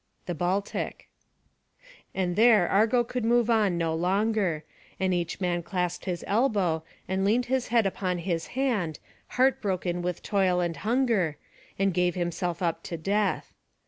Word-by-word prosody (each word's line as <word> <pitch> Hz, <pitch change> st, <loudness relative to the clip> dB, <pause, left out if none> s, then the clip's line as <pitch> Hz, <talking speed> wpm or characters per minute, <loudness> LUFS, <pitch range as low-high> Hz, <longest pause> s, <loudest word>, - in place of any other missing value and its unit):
[D] 180 Hz, -, -3 dB, 1.8 s
And 180 Hz, -2 st, 0 dB
there 220 Hz, -4 st, +5 dB
Argo 225 Hz, +4 st, +3 dB
would 250 Hz, -2 st, -1 dB
move 235 Hz, 0 st, +3 dB
on 210 Hz, -6 st, +2 dB
no 165 Hz, -1 st, 0 dB
longer; 185 Hz, -1 st, +1 dB, 0.4 s
and 190 Hz, -1 st, +1 dB
each 175 Hz, -1 st, -2 dB
man 175 Hz, -2 st, 0 dB
clasped 180 Hz, 0 st, -3 dB
his 180 Hz, -3 st, -3 dB
elbow, 200 Hz, -8 st, +1 dB, 0.2 s
and 190 Hz, +1 st, 0 dB
leaned 230 Hz, +5 st, +2 dB
his 260 Hz, 0 st, 0 dB
head 230 Hz, -2 st, +3 dB
upon 185 Hz, -1 st, -1 dB
his 170 Hz, -1 st, -2 dB
hand, 210 Hz, -, 0 dB, 0.4 s
heartbroken 190 Hz, -9 st, +1 dB
with 175 Hz, -1 st, -3 dB
toil 190 Hz, -3 st, +2 dB
and 170 Hz, -3 st, -1 dB
hunger, 215 Hz, -, +1 dB, 0.4 s
and 195 Hz, -1 st, +1 dB
gave 180 Hz, 0 st, +1 dB
himself 175 Hz, 0 st, -2 dB
up 170 Hz, -2 st, 0 dB
to 170 Hz, -, -5 dB
death. 200 Hz, +5 st, -1 dB
190 Hz, 145 wpm, -27 LUFS, 175-220 Hz, 1.8 s, there